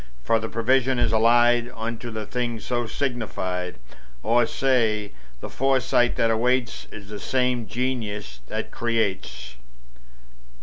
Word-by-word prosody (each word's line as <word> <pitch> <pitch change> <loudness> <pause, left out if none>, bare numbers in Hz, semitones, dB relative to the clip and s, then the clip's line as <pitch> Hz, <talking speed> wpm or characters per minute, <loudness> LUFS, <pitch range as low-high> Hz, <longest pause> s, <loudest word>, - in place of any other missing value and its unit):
For 115 -1 +3
the 110 0 -4
prevision 130 +3 +2
is - - +2
allied 120 +1 +4
Unto 115 +1 -4
the 110 -1 -5
thing 120 0 -2
so 120 +2 -2
signified; 95 -9 -2 0.5
Or 115 +2 +3
say, 110 -6 +1 0.3
the - - -5
foresight 130 -2 +2
that 115 -1 +2
awaits 120 +2 0
Is 100 -2 -10
the 105 -1 -6
same 125 -3 0
Genius 105 - -3
that - - -4
creates. 95 - -2
115 Hz, 125 wpm, -24 LUFS, 105-125 Hz, 0.5 s, allied